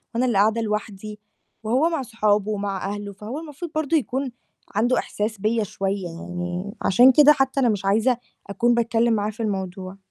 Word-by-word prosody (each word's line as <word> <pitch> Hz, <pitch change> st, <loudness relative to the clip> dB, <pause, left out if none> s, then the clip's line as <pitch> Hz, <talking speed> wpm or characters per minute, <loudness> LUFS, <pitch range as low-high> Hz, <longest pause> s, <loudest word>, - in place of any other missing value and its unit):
وأنا 250 Hz, +2 st, +2 dB
اللي 235 Hz, -5 st, +1 dB
قاعدة 220 Hz, +3 st, +3 dB
لوحدي، 210 Hz, -1 st, -4 dB, 0.4 s
وهو 260 Hz, +10 st, +2 dB
مع 320 Hz, -5 st, -1 dB
صحابه 215 Hz, -3 st, 0 dB
ومع 200 Hz, -2 st, -3 dB
أهله، 205 Hz, -1 st, -7 dB
فهو 215 Hz, +9 st, -6 dB
المفروض 320 Hz, +1 st, -8 dB
برضه 310 Hz, +1 st, +2 dB
يكون 265 Hz, -1 st, -2 dB, 0.4 s
عنده 240 Hz, +5 st, +2 dB
إحساس 210 Hz, +1 st, -3 dB
بيّا 220 Hz, +1 st, +1 dB
شوية 195 Hz, -2 st, -3 dB
يعني، 175 Hz, +4 st, -5 dB
عشان 245 Hz, +7 st, +6 dB
كده 295 Hz, +3 st, +7 dB
حتّى 270 Hz, 0 st, 0 dB
أنا 245 Hz, -3 st, +3 dB
مش 200 Hz, -2 st, -1 dB
عايزة 225 Hz, +5 st, +2 dB, 0.3 s
أكون 240 Hz, +4 st, +2 dB
باتكلّم 235 Hz, 0 st, +2 dB
معاه 210 Hz, 0 st, 0 dB
في 225 Hz, +2 st, -6 dB
الموضوع. 190 Hz, -2 st, -4 dB
215 Hz, 170 wpm, -23 LUFS, 200-245 Hz, 0.4 s, كده